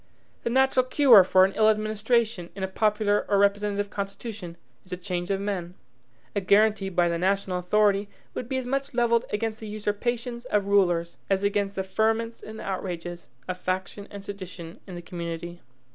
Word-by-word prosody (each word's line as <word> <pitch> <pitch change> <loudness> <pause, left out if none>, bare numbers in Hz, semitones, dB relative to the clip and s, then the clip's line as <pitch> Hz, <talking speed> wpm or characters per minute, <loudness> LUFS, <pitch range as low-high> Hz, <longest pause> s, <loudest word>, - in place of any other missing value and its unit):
The - - -2
natural 265 +1 +3
cure 255 -7 +7
for 185 0 +5
an 195 - -2
ill 220 0 +4
administration, 215 -2 0
in 195 - -5
a - - +1
popular 210 +1 +1
or 200 - +3
representative 205 0 +1
constitution, 200 -3 -6 0.3
is 185 - -18
a 180 - -3
change 180 -1 -3
of 195 -1 0
men. 185 -3 -3 0.6
A 200 - +1
guaranty 205 +1 +3
by 175 -2 +2
the 170 0 -1
national 190 0 0
authority 200 +2 +2 0.2
would 245 - -5
be 265 - -1
as 260 - -3
much 275 +1 -2
levelled 235 0 +3
against 220 -1 -2
the 220 - -7
usurpations 235 +4 -3
of 210 -5 +1
rulers 175 -4 +2
as 195 0 +1
against 200 0 0
the 190 - -1
ferments 225 +4 0
and 220 0 -9
outrages 175 -2 -5 0.2
of 185 0 -4
faction 185 +2 -3
and 200 -1 -9
sedition 185 -4 -8
in 185 - -8
the 175 - -8
community. 170 0 -6
200 Hz, 175 wpm, -26 LUFS, 185-220 Hz, 0.6 s, cure